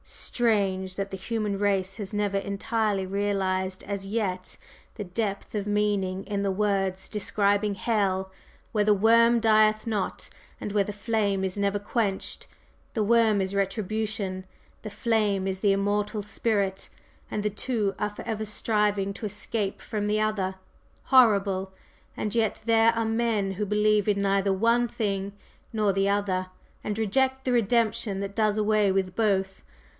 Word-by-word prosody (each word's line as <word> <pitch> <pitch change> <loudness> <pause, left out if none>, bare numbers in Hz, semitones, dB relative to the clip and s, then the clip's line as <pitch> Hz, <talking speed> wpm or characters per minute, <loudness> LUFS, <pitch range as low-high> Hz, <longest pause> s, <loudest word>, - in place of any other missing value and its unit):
Strange 195 -5 0
that 195 0 -3
the - - -3
human 210 0 -2
race 195 -1 0
has 205 -4 -6
never 205 -1 0
entirely 200 0 -1
realized 190 -1 -1
as 195 -1 -4
yet 195 -4 -3 0.4
the 210 - -4
depth 200 +1 -3
of 210 -1 -2
meaning 205 -2 0
in 200 0 -3
the 200 - 0
words 195 -1 0
describing 205 0 +1
hell: 190 -3 0 0.4
'Where 210 -2 +2
the 210 0 +4
worm 230 +3 +5
dieth 215 -1 +4
not, 215 -4 -2 0.3
and 210 - -4
where 205 -1 +2
the 210 - -5
flame 205 -2 0
is 190 -1 -1
never 200 0 0
quenched.' 205 -1 -2 0.5
The 220 - +1
'worm' 220 -2 +4
is 190 +1 -2
Retribution, 200 -1 -2 0.4
the 215 - -6
'flame' 205 -2 0
is 190 -1 -2
the 200 0 +3
immortal 205 +2 0
Spirit, 200 -2 -1 0.4
and 210 - -3
the 210 - 0
two 210 -2 -1
are 210 0 0
forever 220 +1 -5
striving 210 -2 0
to 215 - -5
escape 205 0 -3
from 210 -1 -3
the 210 +1 +1
other. 205 -3 0 0.5
Horrible! 200 - +4 0.4
And 210 - -2
yet 225 -2 0
there 225 0 +5
are 230 -1 -1
men 225 -3 0
who 210 +2 -2
believe 210 0 +2
in 200 -1 +1
neither 195 0 +2
one 230 +5 +2
thing 200 -3 -2 0.4
nor 210 -3 +1
the 195 +1 +1
other, 195 -2 0 0.4
and 210 0 -3
reject 265 +5 +1
the 255 - +1
Redemption 225 -3 +1
that 200 0 -5
does 215 -1 +2
away 210 -1 +3
with 190 -1 -1
both! 195 -4 0
205 Hz, 155 wpm, -26 LUFS, 195-215 Hz, 0.5 s, worm